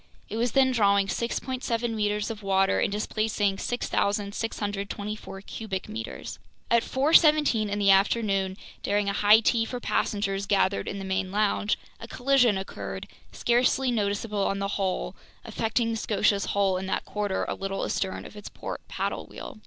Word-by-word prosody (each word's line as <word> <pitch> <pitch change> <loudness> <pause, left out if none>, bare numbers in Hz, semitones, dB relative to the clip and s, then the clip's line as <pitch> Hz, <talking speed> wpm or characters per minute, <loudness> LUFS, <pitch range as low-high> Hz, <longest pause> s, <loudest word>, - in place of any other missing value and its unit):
It 220 - -4
was 235 0 0
then 265 -1 +4
drawing 200 -4 +3
6.7 235 +1 -2
meters 210 0 -1
of 220 -1 -7
water 195 -1 +2
and - - +1
displacing 210 -1 0
6,624 205 -2 -2
cubic 200 -2 -5
meters. 220 +2 -6 0.3
At 235 0 +5
4:17 290 -5 +4
in 200 - -2
the 200 -1 +5
afternoon, 195 -1 +2 0.2
during 205 0 0
a - - -1
high 210 +2 +6
tea 230 +1 +2
for 245 +2 -4
passengers 200 -4 -1
gathered 195 -1 +2
in 200 - -3
the 195 - -5
main 190 0 -1
lounge, 210 0 +1 0.2
a - - -8
collision 250 -5 +3
occurred, 190 - -6 0.2
scarcely 250 +2 +2
noticeable 205 -1 -1
on 195 - -1
the 200 0 -2
whole, 190 - -2 0.3
affecting 230 +1 0
the 225 - -1
Scotia's 210 -2 +1
hull 195 -2 +1
in 190 - -5
that - - -2
quarter 205 -2 -2
a - - -1
little 195 0 -3
astern 190 -1 -2
of - - -11
its 210 - -8
port - - -6
paddle - - -3
wheel. 240 - -9
205 Hz, 160 wpm, -27 LUFS, 195-230 Hz, 0.3 s, high